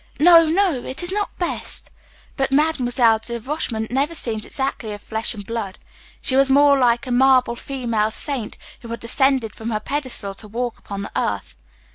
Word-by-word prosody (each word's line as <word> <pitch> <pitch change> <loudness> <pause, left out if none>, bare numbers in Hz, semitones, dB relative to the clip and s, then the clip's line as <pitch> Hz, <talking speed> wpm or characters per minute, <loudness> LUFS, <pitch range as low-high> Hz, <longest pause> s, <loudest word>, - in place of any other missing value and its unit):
No, 330 +1 +7
no; 330 -6 +1
it 265 +7 -3
is 350 - 0
not 410 +1 -3
best." 350 - -3 0.4
But 270 -1 -1
Mademoiselle 255 -6 +3
de 235 +1 -5
Rochemont 230 -4 -3
never 280 +6 0
seemed 220 -7 +1
exactly 265 -5 -3
of 205 - -8
flesh 220 +1 -2
and 205 -1 -8
blood 220 -4 -5 0.4
she 260 - 0
was 270 0 +6
more 285 +1 +5
like 245 -1 +2
a 255 - -5
marble 255 -1 +4
female 235 -5 -2
saint 250 -1 -3 0.2
who 235 - -11
had 230 0 -5
descended 250 0 +2
from 225 +1 -6
her 215 -2 -1
pedestal 255 -5 -3
to 210 +2 -9
walk 240 +2 -4
upon 200 -1 -7
the - - -8
earth. 90 -11 -2
245 Hz, 180 wpm, -21 LUFS, 220-275 Hz, 0.4 s, No